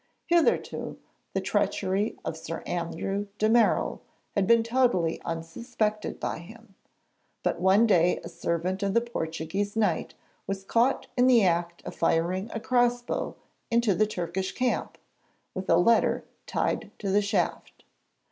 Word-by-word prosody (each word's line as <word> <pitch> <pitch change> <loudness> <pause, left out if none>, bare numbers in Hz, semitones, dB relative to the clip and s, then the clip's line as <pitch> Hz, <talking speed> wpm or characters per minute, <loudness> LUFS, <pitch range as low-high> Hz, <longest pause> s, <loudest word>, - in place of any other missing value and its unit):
Hitherto 340 -1 +1 0.4
the - - 0
treachery 195 +4 0
of - - -2
Sir 165 +1 -6
Andrew 195 +4 -3
de 215 - +2
Merall 230 +1 +3 0.3
had 200 -3 +1
been 230 -1 +5
totally 230 -9 +1
unsuspected 210 +6 -3
by - - -3
him, 220 +4 -14 0.7
but - - 0
one 195 +5 +5
day 180 -5 +3
a - - -6
servant 175 +3 -2
of 200 0 0
the 235 - +5
Portuguese 195 -2 -3
Knight 225 -1 0 0.3
was 195 0 -3
caught 235 +6 +2
in 250 0 +4
the 240 -4 +6
act 170 -1 0
of - - -5
firing 175 +5 0
a 225 - -3
cross 245 0 +2
bow - - -3 0.3
into 235 -3 +3
the 215 +3 +2
Turkish 190 -1 -3
camp, 255 -1 -1 0.6
with 185 0 -5
a 165 - +6
letter 230 +7 +3 0.2
tied - - -1
to 200 -2 -3
the 205 +2 +4
shaft. 200 0 -2
200 Hz, 145 wpm, -27 LUFS, 175-230 Hz, 0.7 s, the